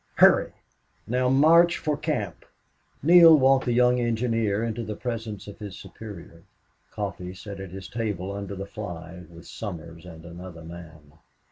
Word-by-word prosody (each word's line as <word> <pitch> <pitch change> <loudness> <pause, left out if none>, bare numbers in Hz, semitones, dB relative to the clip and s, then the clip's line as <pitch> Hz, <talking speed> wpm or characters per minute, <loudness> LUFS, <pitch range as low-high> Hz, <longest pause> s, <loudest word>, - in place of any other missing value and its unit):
"Hurry!... - - +5 0.5
Now 125 +2 +1
march 165 +6 +5
for 150 -1 -1
camp!" 140 - -3 0.6
Neale 165 0 +8
walked 135 -1 +4
the 125 - 0
young 125 +1 +4
engineer 115 -3 0
into 115 0 -3
the 105 -1 -5
presence 110 -4 -5
of 100 - -10
his 105 -3 -8
superior. 85 -6 -11 0.5
Coffee 95 -3 -5
sat 100 0 -9
his 95 0 -8
table 105 -5 -3
under 100 0 -5
the 95 +1 -5
fly, 90 -4 -8
with 85 0 -14
Somers 85 -5 -8
and 80 -1 -11
another 85 -1 -10
man. 80 -3 -12
105 Hz, 145 wpm, -25 LUFS, 90-120 Hz, 0.6 s, Neale